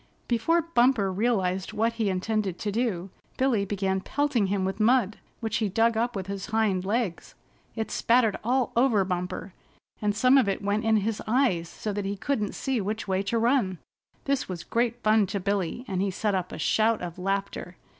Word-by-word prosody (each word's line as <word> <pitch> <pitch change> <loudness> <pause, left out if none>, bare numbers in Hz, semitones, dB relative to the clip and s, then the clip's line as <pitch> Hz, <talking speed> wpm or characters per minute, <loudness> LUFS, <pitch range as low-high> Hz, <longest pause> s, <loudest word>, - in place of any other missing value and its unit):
Before 320 +9 +2
Bumper 245 - +2
realized 190 -3 0
what 225 +2 +1
he 225 -3 0
intended 190 0 -1
to 210 - -3
do, 200 -5 -1 0.3
Billy 250 -6 +2
began 190 -1 -1
pelting 270 -4 0
him 190 -1 0
with 190 +2 -3
mud, 220 -2 +3 0.2
which 225 -2 -1
he 215 -2 0
dug 225 +4 +2
up 235 +1 0
with 190 -2 -3
his 195 0 -5
hind 215 -4 +1
legs. 205 -4 -2 0.4
It 220 -1 -3
spattered 230 -3 +3
all 250 +2 +1
over 235 -5 +3
Bumper, 180 +1 -4 0.5
and 205 -1 +1
some 255 +5 +5
of 210 - +2
it 195 - -2
went 205 +2 0
in 220 -1 +4
his 215 +1 -1
eyes 215 -9 +2
so 210 - -5
that 205 0 -3
he 200 +1 -3
couldn't 220 -1 -2
see 265 -5 -1
which 210 +3 -3
way 190 0 +1
to 200 +4 -1
run. 230 -5 +2 0.5
This 275 -5 0
was 175 -2 -5
great 235 +3 -1
fun 215 -1 +4
to 200 - -2
Billy, 200 +4 -2
and 190 -1 -1
he 200 - +1
set 205 +2 -1
up 185 -1 -2
a - - -6
shout 220 +6 +2
of 175 0 -6
laughter. 195 -1 -3
210 Hz, 195 wpm, -27 LUFS, 190-235 Hz, 0.5 s, some